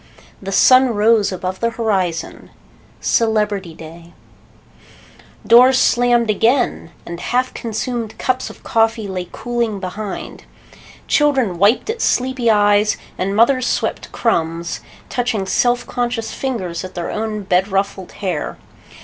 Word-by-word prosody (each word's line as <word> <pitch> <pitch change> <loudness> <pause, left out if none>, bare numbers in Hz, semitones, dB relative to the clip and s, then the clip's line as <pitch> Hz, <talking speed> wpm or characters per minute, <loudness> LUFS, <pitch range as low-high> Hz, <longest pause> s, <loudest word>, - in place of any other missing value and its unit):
The 195 0 -5
sun 255 +3 +5
rose 210 -1 +3
above 185 0 -4
the 230 - +1
horizon. 195 -8 -2 0.5
Celebrity 210 -6 0
day. 165 +2 -12 1.3
Doors 255 +3 +6
slammed 240 -2 +3
again, 230 -4 +1 0.2
and 170 0 -7
half 250 +6 -1
consumed 230 0 -4
cups 255 0 -1
of - - -14
coffee 225 -1 +1
lay 185 -2 -5
cooling 235 -4 -2
behind. 195 +2 -6 0.6
Children 265 - +2
wiped 205 +5 +3
at 455 0 -6
sleepy 255 -2 +1
eyes 205 0 +3 0.2
and 195 +2 -1
mothers 250 +3 +3
swept - - -2
crumbs, 165 -6 -1 0.3
touching 240 -5 -1
self 245 +5 +1
conscious 240 -2 -3
fingers 190 -11 -3
at 185 - -9
their 175 - -4
own 215 -1 -3
bed 185 0 +1
ruffled 195 -1 -2
hair. 180 -7 -4
215 Hz, 125 wpm, -18 LUFS, 190-240 Hz, 1.3 s, Doors